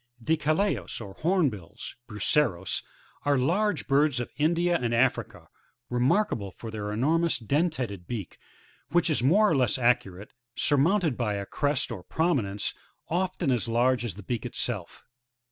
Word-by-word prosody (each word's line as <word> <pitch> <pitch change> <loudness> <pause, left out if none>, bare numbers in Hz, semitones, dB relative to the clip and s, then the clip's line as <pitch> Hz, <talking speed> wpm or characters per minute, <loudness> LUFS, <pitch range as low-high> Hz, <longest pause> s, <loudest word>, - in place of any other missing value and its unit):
The 155 +7 +1
Calaos, 155 - 0
or 100 -4 -8
Hornbil/sf 120 - -1 0.2
Bucerosy 105 -3 +1 0.2
— - - -31
are 145 -1 +3
large 175 +7 +1
birds 140 -1 +3
of 120 - -4
India 170 +4 +2
and 120 -1 0
Africa, 130 +3 0 0.4
remarkable 125 - +1
for 110 +4 -9
their 105 -1 -4
enormous 160 +10 +2
dentated 125 - -1
beak, 110 -7 -6 0.5
which 175 -1 +2
is 145 - +1
more 190 - +5
or 165 - +2
less 130 +1 +2
arcuate, 110 -6 0 0.2
surmounted 155 - +2
by 105 -4 0
a 100 0 -3
crest 145 +3 -1
or 95 -6 -6
promi 160 - +1
nence, 100 +1 -3 0.4
often 180 -4 0
as 120 -2 0
large 120 +1 +2
as 115 -7 -4
the 105 - -10
beak 120 +3 -3
itself. 115 -6 -4
130 Hz, 150 wpm, -27 LUFS, 110-160 Hz, 0.5 s, more